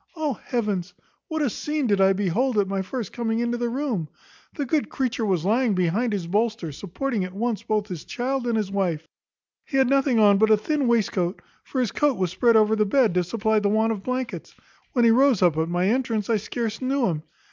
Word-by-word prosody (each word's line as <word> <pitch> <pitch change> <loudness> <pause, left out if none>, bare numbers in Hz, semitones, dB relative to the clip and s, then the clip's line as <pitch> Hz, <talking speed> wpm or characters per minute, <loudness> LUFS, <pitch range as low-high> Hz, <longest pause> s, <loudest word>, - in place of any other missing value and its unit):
Oh 310 -4 -1
heavens! 210 -6 -3 0.3
what 315 -1 -2
a 280 - +1
scene 300 +3 -2
did 200 -4 +2
I 190 0 +5
behold 205 +6 0
at 200 -2 +2
my 195 0 -1
first 225 +2 -5
coming 225 -2 -1
into 240 0 -1
the 240 -1 -1
room! 235 - -2 0.5
The 290 - -2
good 300 +3 0
creature 250 -4 -2
was 180 -4 0
lying 225 +1 +2
behind 190 +6 0
the 185 -5 -3
bolster, 210 -3 -1
supporting 205 - -3
at 185 +1 -7
once 230 +1 -1
both 215 -1 -1
his 175 -6 -6
child 255 0 -3
and 230 -2 +1
his 205 -3 -2
wife. 175 -6 -1 0.6
He 270 - -3
had 265 -1 +4
nothing 270 -3 +3
on 205 -2 +5
but 220 +1 +4
a 215 - +6
thin 285 +5 -1
waistcoat; 200 -6 0 0.2
for 265 - -4
his 245 -5 0
coat 295 -4 +1
was 185 -2 -1
spread 230 +5 +3
over 215 0 +4
the 215 - +2
bed, 220 0 +2
to 180 0 +2
supply 220 +3 0
the 205 -1 0
want 220 +2 +2
of 210 -3 -3
blankets. 255 +2 -4 0.4
When 240 -3 +3
he 230 - +6
rose 255 -4 +4
up 175 -4 +4
at 160 +1 0
my 175 +2 +1
entrance, 230 -3 0
I 225 - +3
scarce 225 +2 -4
knew 265 0 +1
him. 160 -6 -1
220 Hz, 225 wpm, -24 LUFS, 195-250 Hz, 0.6 s, a